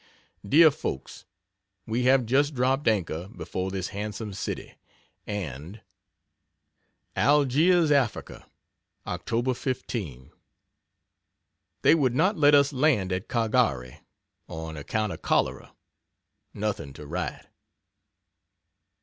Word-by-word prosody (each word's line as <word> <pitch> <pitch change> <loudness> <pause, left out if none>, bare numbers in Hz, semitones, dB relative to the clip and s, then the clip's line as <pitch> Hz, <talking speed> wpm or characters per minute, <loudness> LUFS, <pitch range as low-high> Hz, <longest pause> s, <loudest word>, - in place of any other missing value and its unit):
DEAR 155 +10 +6
FOLKS, 70 - -6 0.6
We 120 +3 -1
have 130 -1 +4
just 140 +5 +2
dropped 130 +3 +1
anchor 90 -5 0
before 95 -1 -5
this 95 -1 -4
handsome 105 +1 -5
city 95 - -5 0.5
and 90 - -6 1.4
ALGIERS, 150 +4 +3
AFRICA, 135 -6 0 0.6
Oct. 120 +2 -1
15. 100 - -5 1.5
They - - +7
would 135 -7 +2
not 190 +10 +3
let 145 -3 +5
us 140 +1 +4
land 130 -9 +2
at 90 +4 -3
Caghari 110 - 0 0.5
on 80 0 -7
account 105 +8 -2
of - - -10
cholera. - - -1 0.8
Nothing 100 -10 -3
to 75 - -10
write. 85 +5 -4
110 Hz, 100 wpm, -26 LUFS, 90-135 Hz, 1.5 s, They